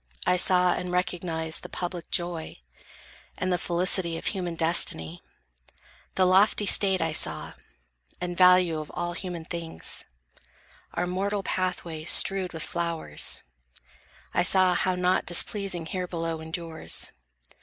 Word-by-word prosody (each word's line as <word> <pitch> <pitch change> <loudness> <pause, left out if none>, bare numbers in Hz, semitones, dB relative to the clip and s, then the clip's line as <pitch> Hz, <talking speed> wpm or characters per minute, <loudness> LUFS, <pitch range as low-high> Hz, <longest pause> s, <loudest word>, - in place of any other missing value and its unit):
I 180 - +3
saw 180 -1 +3
and 180 0 -4
recognized 170 -3 -1
The - - -10
public 175 -2 -6
joy, 175 -3 -3 0.8
and 185 0 -1
the 175 - 0
felicity 175 -1 +2
Of - - -9
human 180 -4 -2
destiny. 160 - +1 0.9
The 185 - +3
lofty 195 +3 +4
state 190 -3 +4
I 165 - -1
saw, 155 - -1 0.7
and 175 0 -4
value 180 -3 +5
of 155 - -8
all 175 0 -3
human 175 -2 -6
things; 165 - -5 0.9
Our - - 0
mortal 195 +3 -2
pathway 180 -4 -3
strewed 190 +1 +2
with 165 -2 -4
flowers; 170 -1 +1 0.9
I - - +2
saw 185 +1 +4
How 185 +1 0
naught 180 +1 0
displeasing 180 0 +3
here 180 +2 -4
below 165 -2 -4
endures. 160 0 -2
175 Hz, 130 wpm, -26 LUFS, 165-185 Hz, 0.9 s, value